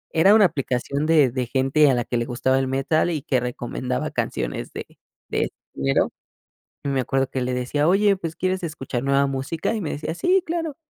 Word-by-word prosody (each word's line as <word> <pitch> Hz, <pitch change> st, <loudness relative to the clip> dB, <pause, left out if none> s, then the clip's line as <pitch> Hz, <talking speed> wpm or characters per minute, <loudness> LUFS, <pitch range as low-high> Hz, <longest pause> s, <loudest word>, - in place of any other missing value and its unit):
era 190 Hz, +6 st, +6 dB
una 215 Hz, -2 st, +7 dB
aplicación 140 Hz, -2 st, -1 dB
de 155 Hz, -4 st, +5 dB
de 125 Hz, +1 st, -2 dB
gente 135 Hz, +4 st, +3 dB
a -, -, +2 dB
la 120 Hz, -2 st, 0 dB
que 120 Hz, -, -2 dB
le 120 Hz, -, -1 dB
gustaba 125 Hz, +2 st, +1 dB
el 135 Hz, -, +1 dB
metal 140 Hz, +6 st, +1 dB
y 155 Hz, -3 st, -2 dB
que 130 Hz, -1 st, +1 dB
recomendaba 125 Hz, +1 st, -3 dB
canciones -, -, -3 dB
de -, -, -5 dB, 0.4 s
de -, -, -1 dB
este -, -, -5 dB, 0.2 s
género 70 Hz, 0 st, +1 dB, 0.7 s
y 140 Hz, -, -2 dB
me 135 Hz, -1 st, 0 dB
acuerdo 135 Hz, +1 st, 0 dB
que 130 Hz, -, -3 dB
le 125 Hz, 0 st, -1 dB
decía: 125 Hz, +4 st, 0 dB
"Oye 200 Hz, +2 st, +4 dB
pues, 165 Hz, -3 st, -5 dB
¿quieres 185 Hz, 0 st, -1 dB
escuchar 140 Hz, -6 st, -4 dB
nueva 140 Hz, 0 st, +3 dB
música?", 135 Hz, +8 st, -2 dB
y 225 Hz, -, -2 dB
me 160 Hz, -, -3 dB
decía: 155 Hz, +2 st, -4 dB
"Sí 365 Hz, -, +2 dB
claro", 325 Hz, -3 st, -3 dB
140 Hz, 210 wpm, -23 LUFS, 130-165 Hz, 0.7 s, una